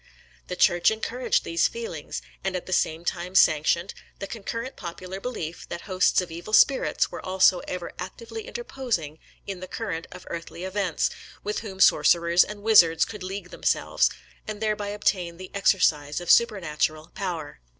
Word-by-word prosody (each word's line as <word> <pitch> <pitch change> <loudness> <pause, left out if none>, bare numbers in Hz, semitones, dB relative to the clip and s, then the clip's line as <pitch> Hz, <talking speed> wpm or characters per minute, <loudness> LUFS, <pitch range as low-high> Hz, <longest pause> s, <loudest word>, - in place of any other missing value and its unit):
The 180 - -4
Church 175 -1 +4
encouraged 230 +3 -1
these 165 0 +2
feelings; 465 +1 -6 0.2
and 195 -1 -1
at 180 - -3
the 185 - -4
same 165 -1 0
time 180 +1 -3
sanctioned; 170 +3 +4 0.2
the - - -5
concurrent 230 +4 -5
popular 185 +1 -7
belief 185 -8 -6
that 170 - -5
hosts 185 -1 +2
of 180 -2 -7
evil 170 +6 -8
spirits 265 +4 +4
were - - -7
also 185 -1 +4
ever 180 -1 -5
actively 230 - -7
interposing 245 - -3 0.3
in 195 -2 -5
the 185 - -7
current 185 -5 -4
of 180 - -11
earthly 170 +1 -6
events, 190 -3 0 0.3
with 210 - -2
whom 195 -4 -8
sorcerers 170 +1 +5
and 205 -1 -8
wizards 170 -7 +6
could 210 -3 -9
league 185 0 -6
themselves, - - +1 0.4
and 215 -1 -5
thereby 210 -1 -1
obtain 185 -4 -1
the 185 +1 -10
exercise 150 -7 +2
of 175 - +1
supernatural 160 -8 +2
power. 175 - -5
185 Hz, 160 wpm, -26 LUFS, 170-210 Hz, 0.4 s, wizards